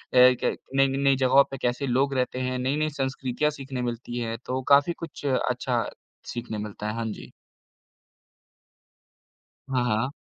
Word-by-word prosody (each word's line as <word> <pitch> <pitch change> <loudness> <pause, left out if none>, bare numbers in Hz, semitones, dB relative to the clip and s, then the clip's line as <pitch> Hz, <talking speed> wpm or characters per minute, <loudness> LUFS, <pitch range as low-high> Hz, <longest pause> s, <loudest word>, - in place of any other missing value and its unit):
क 125 0 +5 0.2
नई 135 0 +5
न 135 0 -2
नई 140 -1 +4
ज़गहों 135 +1 +5
पे 135 - -4
कैसे 125 +3 0
लोग 135 +3 +2
रहते 125 0 0
हैं, 130 0 -1
नई-नई 145 +4 0
संस्कृतियाँ 135 +2 0
सीखने 135 -3 -5
मिलती 120 0 -4
हैं, 115 -1 -3
तो 130 +1 -2
काफ़ी 145 +4 +5
कुछ 160 -3 -8
अच्छा 125 -2 0 0.5
सीखने 120 -2 -4
मिलता 105 0 -5
है, 105 - -2
हाँ 115 0 -2
जी। - - -9 2.4
हाँ, 125 -2 +2
हाँ। 115 +2 +1
130 Hz, 155 wpm, -26 LUFS, 120-135 Hz, 2.4 s, क